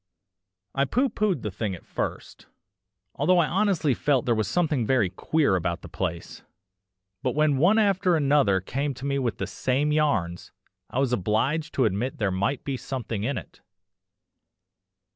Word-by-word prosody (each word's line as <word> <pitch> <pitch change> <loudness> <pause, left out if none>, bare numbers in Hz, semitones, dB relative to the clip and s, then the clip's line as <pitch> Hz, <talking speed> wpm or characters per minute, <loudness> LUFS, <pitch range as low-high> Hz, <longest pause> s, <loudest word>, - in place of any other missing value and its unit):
I 140 - +2
pooh 255 - +1
poohed 200 - -1
the 105 - -3
thing 100 0 -3
at 85 - -14
first, - - -5 0.7
although 180 +6 +2
I 170 - +4
honestly 185 -5 +1
felt 135 -1 +1
there 120 - +3
was 110 -3 0
something 150 - +1
very 110 -6 +2
queer 140 - +1
about 85 -1 -2
the - - -8
place, 85 -2 -4 0.8
but 130 -1 -1
when 150 -2 +3
one 185 +9 +4
after 195 -4 +3
another 140 - +3
came 135 +7 -3
to 135 +2 -8
me 140 0 0
with 125 -4 -1
the - - -2
same 140 +4 0
yarns, 110 - 0 0.4
I - - -5
was 135 -2 +1
obliged 120 - 0
to 130 - +3
admit 110 +5 -1
there 105 -3 0
might 100 +9 -1
be 135 -2 -3
something 120 -6 -4
in 130 +4 -1
it. - - -10
135 Hz, 165 wpm, -26 LUFS, 105-150 Hz, 0.8 s, I